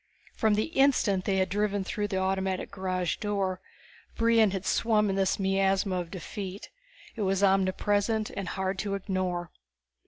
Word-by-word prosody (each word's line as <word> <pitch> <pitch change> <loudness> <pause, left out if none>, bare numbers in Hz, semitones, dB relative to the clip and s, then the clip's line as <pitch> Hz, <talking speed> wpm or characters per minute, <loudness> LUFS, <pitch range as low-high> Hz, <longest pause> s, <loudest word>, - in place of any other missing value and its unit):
From 220 -2 +2
the 215 - +1
instant 245 - +3
they 195 - +1
had 190 0 +2
driven 205 0 0
through 205 +1 -2
the 195 -2 -2
automatic 190 0 -1
garage 185 -3 -2
door, 195 -3 -2 0.6
Brion 230 -2 +4
had 190 0 -4
swum 210 -3 +2
in - - -1
this 195 -1 +1
miasma 195 0 +1
of 175 -2 -5
defeat. 190 +2 -7 0.4
It 225 - -5
was 195 0 +1
omnipresent 205 +3 +2
and 195 -2 -5
hard 190 0 -2
to 200 -2 -1
ignore. 185 -3 -2
195 Hz, 155 wpm, -28 LUFS, 190-205 Hz, 0.6 s, Brion